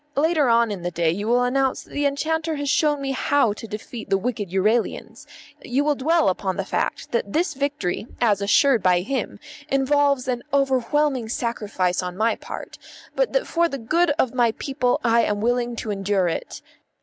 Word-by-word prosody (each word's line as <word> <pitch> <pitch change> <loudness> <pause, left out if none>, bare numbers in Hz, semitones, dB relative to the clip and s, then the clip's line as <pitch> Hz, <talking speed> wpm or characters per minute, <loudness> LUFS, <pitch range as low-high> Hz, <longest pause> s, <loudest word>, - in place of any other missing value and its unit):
Later 305 -2 +2
on 230 -1 +3
in 195 -3 -5
the 175 - -2
day 170 -1 +1
you 205 +5 -4
will 245 +1 +3
announce 265 +1 0
that - - -21
the 285 0 +1
enchanter 315 +3 -1
has 285 -1 -4
shown 295 -1 +2
me 270 - -1
how 270 -4 +2
to 225 - -9
defeat 220 +2 -8
the 195 - +3
wicked 210 -2 -3
Euralians; 210 +5 -1 0.3
you 260 +3 0
will 300 0 +2
dwell 315 +5 +2
upon 190 0 -1
the 195 - -2
fact - - -2
that 230 -4 -1
this 335 0 +1
victory, 275 -8 -2
as 210 -4 +2
assured 235 +4 +4
by 180 -1 +3
him, 265 +8 -3 0.3
involves 280 -1 +2
an 245 -2 -1
overwhelming 270 -2 +1
sacrifice 210 -7 -1
on 180 0 -6
my 225 +2 +2
part, - - -9 0.4
but - - +1
that - - +1
for 340 0 +1
the 275 - -4
good 330 +9 +1
of 260 -5 +1
my 240 -3 +2
people 260 0 -1
I 230 -1 +4
am 205 -2 0
willing 240 +2 0
to 225 -2 -4
endure 195 -2 0
it. 165 - -5
245 Hz, 190 wpm, -23 LUFS, 205-280 Hz, 0.4 s, assured